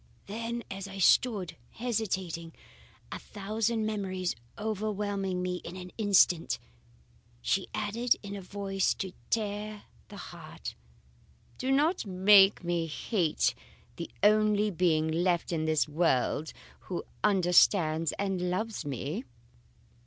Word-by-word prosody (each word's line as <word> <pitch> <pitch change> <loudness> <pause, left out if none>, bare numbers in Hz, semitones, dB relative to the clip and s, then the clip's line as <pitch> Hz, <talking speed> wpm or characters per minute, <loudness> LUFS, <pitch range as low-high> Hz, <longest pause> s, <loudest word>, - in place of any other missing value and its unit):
Then 230 +3 -4
as 195 0 -5
I 195 0 -8
stood 190 -3 +3
hesitating, 190 -8 -3 0.6
a - - -4
thousand 215 +2 -2
memories 190 -4 -2 0.2
overwhelming 205 -3 -2
me 180 0 -1
in 175 0 -8
an 180 -1 -8
instant, 195 -5 +3 0.8
she - - 0
added 235 +3 +1
in 200 0 -6
a 200 - -6
voice 195 0 -1
to 190 -1 -5 0.2
tear 210 -1 -2 0.2
the - - -11
heart, - - -8 0.9
'Do 260 - -2
not 305 +7 +2
make 195 +1 +6
me 170 -1 0
hate 160 - 0 0.4
the 170 - -5
only 210 0 +4
being 165 -3 +2
left 175 +2 +1
in 160 -2 0
this 155 -1 +2
world 150 -1 +1 0.3
who 180 - -5 0.2
understands 175 -4 +4
and 190 -3 -1
loves 220 +2 -2
me. 145 - -4
195 Hz, 115 wpm, -30 LUFS, 175-210 Hz, 0.9 s, make